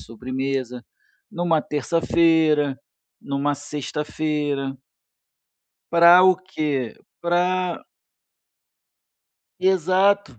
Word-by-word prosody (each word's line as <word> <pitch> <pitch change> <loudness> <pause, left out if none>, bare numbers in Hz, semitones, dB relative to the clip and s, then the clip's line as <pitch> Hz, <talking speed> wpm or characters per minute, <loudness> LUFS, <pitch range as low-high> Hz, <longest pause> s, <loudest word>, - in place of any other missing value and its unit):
sobremesa, 130 +1 -5 0.5
numa 170 -3 0
terça-feira, 155 -1 +1 0.4
numa 140 +1 -2
sexta-feira. 145 -1 -4 1.2
Pra 170 +2 +7
o 185 -1 +5
quê? 150 -9 -3 0.3
Pra 180 - -1 1.7
Exato. 190 - +1
155 Hz, 60 wpm, -22 LUFS, 140-175 Hz, 1.7 s, Pra